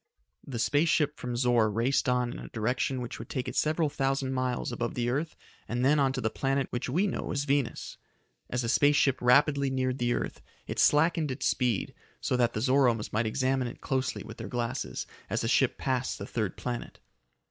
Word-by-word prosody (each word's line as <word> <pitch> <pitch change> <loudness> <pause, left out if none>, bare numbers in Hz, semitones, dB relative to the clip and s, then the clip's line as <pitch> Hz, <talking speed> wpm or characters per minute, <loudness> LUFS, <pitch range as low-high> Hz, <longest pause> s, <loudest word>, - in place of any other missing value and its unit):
The 130 -4 -4
space 145 +7 +2
ship 150 -2 +1
from 125 -1 -4
Zor 120 -3 +3
raced 120 +5 +1
on 125 -1 +1
in - - -7
a - - -8
direction 125 +3 -1
which 120 - -6
would 115 - -8
take 130 -2 -3
it - - -5
several 155 +1 +2
thousand 135 -1 -1
miles 130 -1 -1
above 120 -1 -3
the 120 0 0
earth 155 +5 -2 0.3
and 120 +2 -1
then 145 +2 +4
on 135 -1 +3
to - - -3
the 110 - 0
planet 135 +2 0
which 120 - -3
we 175 +10 +2
know 200 - -3
as 140 -1 0
Venus. 140 -3 -1 0.5
As 125 0 -1
the 115 - -1
space 145 +3 +4
ship 135 -2 +3
rapidly 140 +3 +4
neared 130 0 -1
the 120 0 +1
earth, - - -4 0.2
it - - -4
slackened 160 0 +4
its 130 +1 -3
speed, 120 -6 0 0.3
so - - 0
that 120 -1 +2
the 110 - -2
Zoromes 125 -4 +2
might 110 +1 +1
examine 130 +2 0
it - - -9
closely 130 -1 -1
with 115 - -10
their 115 - -6
glasses 115 - -3 0.2
as - - 0
the - - -1
ship - - +2
passed 130 -1 -1
the - - -6
third 110 -5 -3
planet. 120 -1 -5
130 Hz, 210 wpm, -29 LUFS, 120-140 Hz, 0.5 s, then